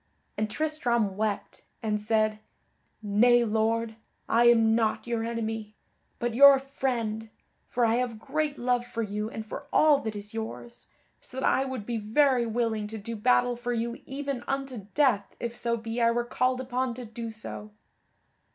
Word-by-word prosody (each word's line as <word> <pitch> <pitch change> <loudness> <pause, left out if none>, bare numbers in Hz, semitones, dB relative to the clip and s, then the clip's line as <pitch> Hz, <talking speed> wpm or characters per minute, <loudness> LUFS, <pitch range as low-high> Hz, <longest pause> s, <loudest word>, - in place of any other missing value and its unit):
And 215 0 -1
Tristram 240 -8 0
wept, 210 0 -3 0.2
and 210 -1 0
said: 215 0 +1 0.6
"Nay, 240 +4 +4
Lord, 225 +1 0 0.3
I 235 +1 +4
am 225 -2 +6
not 225 -1 +1
your 235 -1 -1
enemy, 225 -2 -4 0.4
but 240 -1 -2
your 280 +3 +9
friend, 240 -5 -3 0.4
for 240 -1 +2
I 225 +1 +2
have 245 -3 -1
great 300 +5 -2
love 245 0 +1
for 235 -1 -4
you 210 +1 -3
and 220 -1 -6
for 280 +6 -7
all 300 -2 +5
that 220 -5 -4
is 205 +1 -7
yours, 225 +1 -7 0.3
so 260 - -9
that - - -1
I 270 - +3
would 260 -6 -5
be 235 0 -2
very 240 +3 +2
willing 225 -2 -1
to 220 +1 -6
do 230 +2 -6
battle 245 +2 +3
for 240 0 -3
you 235 0 -3
even 275 -2 -4
unto 270 -7 -3
death 250 -9 +2
if 235 0 -4
so 235 -1 -1
be 225 +1 -4
I 230 - +5
were 240 +1 0
called 255 +1 0
upon 250 -1 -2
to 250 0 -7
do 230 +1 -6
so." 215 -1 -8
235 Hz, 170 wpm, -28 LUFS, 220-250 Hz, 0.6 s, your